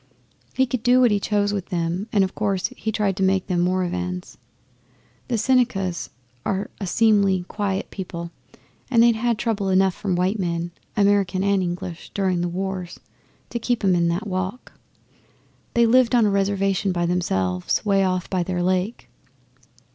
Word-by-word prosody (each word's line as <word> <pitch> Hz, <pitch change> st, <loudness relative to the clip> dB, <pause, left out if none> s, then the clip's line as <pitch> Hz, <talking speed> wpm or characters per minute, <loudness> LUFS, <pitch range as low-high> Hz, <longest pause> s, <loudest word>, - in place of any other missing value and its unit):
He 260 Hz, -, +3 dB
could 250 Hz, -2 st, -3 dB
do 245 Hz, +2 st, +4 dB
what 245 Hz, -3 st, +5 dB
he 205 Hz, -, +2 dB
chose 205 Hz, 0 st, 0 dB
with 195 Hz, -3 st, -3 dB
them, 175 Hz, +3 st, -2 dB
and, 200 Hz, -2 st, +3 dB
of 190 Hz, -, -2 dB
course, 200 Hz, -3 st, -1 dB
he 220 Hz, -, -3 dB
tried 205 Hz, -3 st, 0 dB
to -, -, -3 dB
make 190 Hz, 0 st, +2 dB
them 175 Hz, -2 st, 0 dB
Moravians. 180 Hz, 0 st, -2 dB, 0.9 s
The 240 Hz, -, 0 dB
Senecas 215 Hz, -7 st, +1 dB, 0.3 s
are 195 Hz, +1 st, -2 dB
a 195 Hz, -, -4 dB
seemly, 200 Hz, -3 st, +3 dB
quiet 200 Hz, -1 st, -3 dB
people, 170 Hz, -3 st, -6 dB, 0.6 s
and 230 Hz, -3 st, +5 dB
they'd 235 Hz, -1 st, +5 dB
had 235 Hz, 0 st, 0 dB
trouble 215 Hz, -4 st, -1 dB
enough 190 Hz, 0 st, +3 dB
from 190 Hz, -1 st, -2 dB
white 185 Hz, +4 st, 0 dB
men 170 Hz, -1 st, -2 dB, 0.3 s
American 200 Hz, -2 st, +2 dB
and 200 Hz, -1 st, +2 dB
English 175 Hz, -1 st, -5 dB
during 185 Hz, -3 st, +1 dB
the 175 Hz, -, -1 dB
wars, 185 Hz, 0 st, -4 dB, 0.5 s
to 235 Hz, -, -2 dB
keep 240 Hz, -1 st, -1 dB
'em 190 Hz, -2 st, +4 dB
in 170 Hz, -1 st, +2 dB
that 175 Hz, +6 st, -1 dB
walk. 185 Hz, +4 st, -4 dB, 1.0 s
They 235 Hz, 0 st, +5 dB
lived 250 Hz, +1 st, +4 dB
on 235 Hz, -2 st, +5 dB
a 205 Hz, -, +2 dB
Reservation 195 Hz, 0 st, +1 dB
by 175 Hz, -1 st, 0 dB
themselves 95 Hz, -, 0 dB
away 195 Hz, -1 st, +3 dB
off 185 Hz, -2 st, 0 dB
by 185 Hz, -2 st, -1 dB
their 175 Hz, 0 st, -2 dB
lake. 185 Hz, +5 st, -1 dB
195 Hz, 170 wpm, -23 LUFS, 180-210 Hz, 1.0 s, what